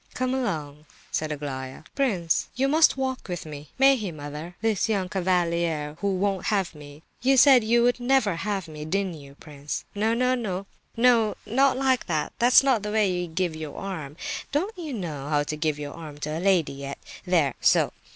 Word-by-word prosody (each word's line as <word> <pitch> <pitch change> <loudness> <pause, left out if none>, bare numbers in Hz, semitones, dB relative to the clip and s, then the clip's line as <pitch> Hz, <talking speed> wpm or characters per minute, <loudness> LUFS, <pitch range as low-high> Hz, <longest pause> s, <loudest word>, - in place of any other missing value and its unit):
"Come 255 0 -1
along," 155 - -3 0.2
said 155 0 -1
Aglaya. 135 -2 -5
"Prince, 195 - 0
you 270 +2 +1
must 310 0 +4
walk 260 -1 -3
with 175 -2 -4
me. 150 -1 -9
May 270 +1 +6
he, 210 -7 -4
mother? 150 +3 -8
This 220 -1 0
young 195 -4 0
cavalier, 170 -5 0
who 200 -1 +1
won't 195 0 -1
have 195 -5 0
me? 145 0 -13 0.2
You 265 +1 +3
said 260 -2 +7
you 235 +2 +3
would 245 +1 +2
never 245 -7 +2
have 195 -1 -2
me, 150 -1 -8
didn't 190 +3 -1
you, 140 0 -14
prince? 145 -1 -6
No—no, 225 -2 0 0.3
not 240 +2 +3
like 260 -1 +1
that; 155 -4 -1
that's 245 +3 +6
not 260 -5 +3
the 210 0 -4
way 210 -3 +2
to 175 - -4
give 170 0 -2
your 155 -2 -7
arm. 160 -7 -6 0.3
Don't 370 +10 -1
you 335 -5 -6
know 155 - -5
how 145 -1 +2
to 155 - -4
give 155 -1 -1
your 145 -1 -6
arm 155 -3 -9
to 150 +1 -3
a - - -2
lady 180 -5 +2
yet? 140 0 -6 0.3
There—so. 160 -8 +2
185 Hz, 180 wpm, -25 LUFS, 150-240 Hz, 0.3 s, said